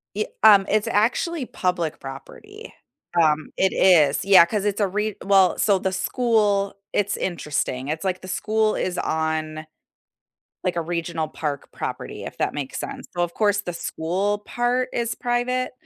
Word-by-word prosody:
Ye 215 - 0 0.2
um, 200 -3 +8
it's 215 0 +1
actually 255 +8 +1
public 180 -6 -2
property. 410 - -10 0.5
Um, 155 -1 +2
it 190 - +2
is. 150 -7 +4
Yeah, 190 -3 +7
'cause 205 +3 -2
it's 205 +1 0
a 200 - +3
re 210 +2 -2
well 195 -2 +4
so 200 -3 +3
the 190 - -1
school 205 -2 +1 0.2
it's 205 -1 +1
interesting, 145 -6 -2
it's 155 +3 -3
like 185 -1 -2
the 185 - -10
school 215 +3 0
is 180 -1 -2
on, 160 -1 -2 1.0
like, 180 -1 -1
a 170 - 0
regional 165 -1 -3
park 150 -2 -5
property, - - -6
if - - -7
that - - -1
makes 140 -2 -4
sense. 270 -1 -7
So, 175 - 0
of 175 -1 -2
course, 205 -1 +2
the 175 -3 -5
school 190 +6 -2
part 245 +4 -1
is 235 -1 -1
private, 245 +1 -1
190 Hz, 165 wpm, -23 LUFS, 165-215 Hz, 1.0 s, um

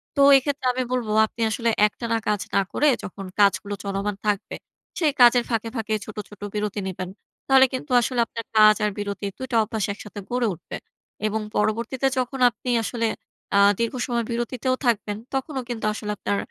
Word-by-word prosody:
তো 280 - +2 0.2
এক্ষেত্রে 275 0 -2
আমি 255 +1 -1
বলবো 240 -4 -1 0.2
আপনি 230 - -9
আসলে 230 +1 0 0.2
একটানা 230 +2 -2
কাজ 210 -2 +1
না 200 - +5
করে, 300 - +3 0.2
যখন 195 +1 -7
কাজগুলো 200 0 +3
চলমান 200 +1 -2
থাকবে, 205 -2 -1 0.4
সেই 315 -4 +3
কাজের 245 0 +7
ফাঁকে, 225 -1 -1
ফাঁকে 220 -2 -2
ছোট, 215 - -10
ছোট 205 - -15
বিরতি 210 -1 -2
নিবেন। 185 -1 -5 0.4
তাহলে 265 -1 +7
কিন্তু 260 +2 -5
আসলে 245 +1 -1
আপনার 230 0 -7
কাজ 215 0 +8
আর - - +2
বিরতির 200 0 -4
২ 260 -2 -4
অভ্যাস 215 -1 -2
একসাথে 210 0 -9
গড়ে 245 -1 +1
উঠবে 170 +1 -8 0.5
এবং 220 +1 -1
পরবর্তীতে 230 +5 0
যখন 255 +1 -3
আপনি 240 +2 -8
আসলে 230 +1 -1 0.5
আ - - +6 0.2
দীর্ঘসময় 235 0 -1
বিরতিতেও 240 +2 -1
থাকবেন, 210 -3 +1 0.2
তখনও 270 0 -2
কিন্তু 230 -3 -3
আসলে 210 0 -4
আপনার 100 - -1
225 Hz, 170 wpm, -24 LUFS, 205-250 Hz, 0.5 s, কাজ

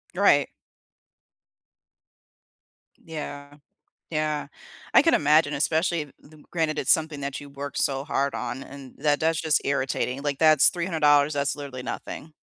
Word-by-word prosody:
Right. - - +4 2.5
Yeah. 145 -2 -8 0.5
Yeah. 155 -2 -2 0.5
I - - +8
can 330 +2 +3
imagine, 150 0 +3
especially 160 0 0
them 150 0 -19
granted 160 -3 -1
it's - - +2
something 155 -2 +1
that 140 0 -4
you 145 - -11
worked 140 0 -6
so 135 -1 0
hard 140 -1 -1
on, 125 +2 -4
and 135 -2 -12
that 145 0 +1
that's 160 0 +1
just 160 -2 +2
irritating. 135 -1 -1
Like, 145 -1 -2
that's 155 -3 +6
$300. 155 -4 +2
That's 140 0 -1
literally 140 -3 -7
nothing. 155 +4 -7
145 Hz, 135 wpm, -25 LUFS, 140-155 Hz, 2.5 s, I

